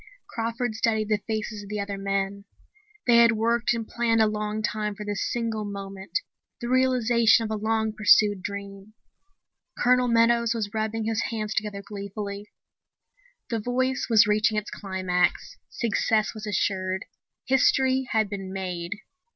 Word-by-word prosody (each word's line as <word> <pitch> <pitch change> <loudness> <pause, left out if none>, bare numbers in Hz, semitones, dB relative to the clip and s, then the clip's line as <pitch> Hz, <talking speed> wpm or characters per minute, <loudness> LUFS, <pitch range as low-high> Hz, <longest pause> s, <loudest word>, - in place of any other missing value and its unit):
Crawford 230 +1 -3
studied 220 -1 0
the 210 -1 +1
faces 215 -1 -3
of 200 - -11
the 210 0 -3
other 200 0 -4
men. 195 0 -2 0.6
They 240 -1 +5
had 235 -1 +6
worked 230 +2 +1
and 225 -1 -4
planned 235 -1 +1
a 220 - +6
long 210 0 -2
time 210 0 -2
for 210 - -7
this 205 -1 -2
single 230 -2 -2
moment, 195 - -5 0.4
the 240 - -4
realization 245 -3 +4
of 220 - -4
a - - 0
long 220 0 0
pursued 210 -2 +4
dream. 200 +1 -7 0.8
Colonel 250 0 +3
Meadows 235 0 +3
was 210 -3 -3
rubbing 220 0 -2
his 225 0 0
hands 215 -2 -3
together 210 -2 -3
gleefully. 200 0 -6 1.0
The 230 - 0
voice 255 +3 -1
was 225 -1 +6
reaching 215 +1 +2
its 210 - -3
climax. 185 -2 -1
Success 220 -1 0
was 215 -1 -8
assured. 190 -1 -1 0.4
History 265 0 +3
had 220 -1 +2
been 195 -2 -6
made! 180 -2 -4
215 Hz, 150 wpm, -26 LUFS, 200-230 Hz, 1.0 s, had